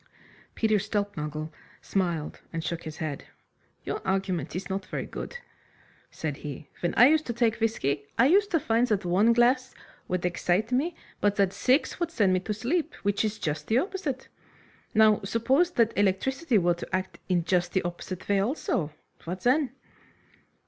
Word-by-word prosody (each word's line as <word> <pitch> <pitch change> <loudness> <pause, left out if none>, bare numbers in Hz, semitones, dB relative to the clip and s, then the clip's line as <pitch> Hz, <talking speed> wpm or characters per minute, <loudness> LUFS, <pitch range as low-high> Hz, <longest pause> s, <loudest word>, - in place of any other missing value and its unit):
Peter 215 -2 +2
Stulpnagel 155 -7 -3 0.3
smiled 170 -6 -2
and 165 -1 -3
shook 170 0 -4
his 155 0 -7
head. 155 -4 -4 0.6
"Your - - -3
argument 190 -6 -1
is 185 - -4
not 195 0 -2
very - - -3
good," 485 - -6 0.7
said 150 -3 -4
he. 145 0 -8
"When 175 - -1
I 245 - +8
used 310 +3 +4
to 235 - -1
take 230 -1 +1
whisky, 145 - 0
I 235 - +6
used 395 +8 +4
to 330 - +2
find 235 -2 +2
that 210 -4 0
one 195 +6 +4
glass 250 +2 +3 0.3
would 180 -1 -1
excite 180 +5 0
me, 305 +7 +1 0.2
but 205 0 +2
that 195 -1 +2
six 265 +7 +2
would 345 -1 0
send 205 - +2
me 185 - +3
to 200 +4 -5
sleep, 285 - -1
which 205 +1 +1
is 215 0 -1
just 150 -2 -3
the 225 - +3
opposite. 305 -5 -2 0.7
Now, 215 -1 +5
suppose 230 - +2
that 230 -1 +3
electricity 230 - +1
were 175 -2 +3
to 170 +2 -4
act 185 0 -4
in 175 -2 +2
just 175 0 +1
the 190 - +1
opposite 175 +1 -6
way 200 -1 +3
also, 195 - 0 0.4
what 180 +2 -4
then?" 260 +4 +3
205 Hz, 170 wpm, -27 LUFS, 175-245 Hz, 0.7 s, I